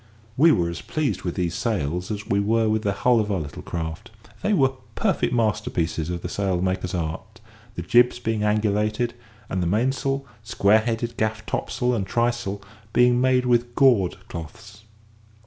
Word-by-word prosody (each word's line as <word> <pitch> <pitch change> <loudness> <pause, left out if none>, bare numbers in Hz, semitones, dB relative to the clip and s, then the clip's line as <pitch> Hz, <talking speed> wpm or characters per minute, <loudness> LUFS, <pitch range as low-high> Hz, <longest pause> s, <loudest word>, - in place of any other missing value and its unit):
We 160 +6 +6
were 85 - +2
as 85 0 -5
pleased 155 -3 -2
with 85 - -3
these 85 -3 -1
sails 90 - -2
as 105 -1 -4
we 100 - +1
were 110 +2 +2
with 110 0 +1
the 100 - 0
hull 120 +4 +3
of 105 -1 -1
our 95 - 0
little 75 -3 -7
craft. 80 +6 -5 0.3
They 210 - 0
were 135 -9 +3 0.2
perfect - - +1
masterpieces 105 -8 0
of 85 -1 -4
the - - -2
sailmaker's 95 -1 -1
art, 85 +7 -5 0.4
the 85 - -4
jibs 120 +8 +4
being 115 -2 -2
angulated, 105 +2 +1 0.4
and 95 - -2
the 85 - 0
mainsail, 135 +7 0 0.2
square 110 -2 +3
headed 115 +1 -3
gaff 110 0 -1
topsail, 125 0 -1
and 100 -5 -1
trysail 120 -3 -1 0.3
being 125 0 +4
made 130 -1 +3
with 120 -1 +1
gored 115 -10 +4
cloths. 105 +6 -10
110 Hz, 165 wpm, -24 LUFS, 90-120 Hz, 0.4 s, We